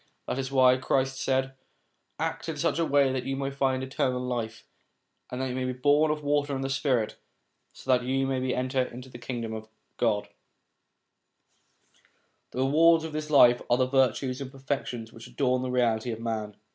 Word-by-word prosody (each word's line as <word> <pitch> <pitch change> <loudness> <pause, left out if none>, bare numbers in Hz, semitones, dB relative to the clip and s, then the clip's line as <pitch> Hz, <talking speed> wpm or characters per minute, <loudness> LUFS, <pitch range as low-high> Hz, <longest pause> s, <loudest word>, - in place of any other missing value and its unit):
That 130 - -3
is 135 0 -3
why 130 -1 +5
Christ 135 0 0
said, 130 0 0 0.3
' - - -46 0.3
Act - - -3
in - - -4
such 160 - 0
a 165 - +2
way 140 -1 +4
that 130 -2 -2
you 135 0 -2
may 135 0 -2
find 135 -1 0
eternal 130 -1 -1
life, 120 -3 -4 0.6
and 125 - -5
that 130 0 -1
you - - -3
may 130 0 -2
be 130 - -1
born 145 +4 +3
of 150 0 -2
water 145 -1 +1
and 135 - -3
the 135 - -2
spirit, 130 -5 0 0.5
so 130 - -3
that 125 -1 +3
you 135 +1 0
may 130 -1 -1
enter 130 +1 0
into 125 +1 -6
the 120 - -11
Kingdom.' 115 -3 -5 0.3
The 105 -3 +1 2.3
rewards 160 +5 +4
of 160 -1 -6
this 155 0 -4
life 125 -5 +6
are 120 - +4
the 130 - +3
virtues 130 0 +1
and 130 -1 -6
perfec 135 0 -3
tions 115 -2 -6
which 115 - -11
adorn 130 -2 0
the 130 - -3
reality 120 -2 +1
of 110 - -5
man. 110 -3 -3
130 Hz, 190 wpm, -27 LUFS, 125-135 Hz, 2.3 s, life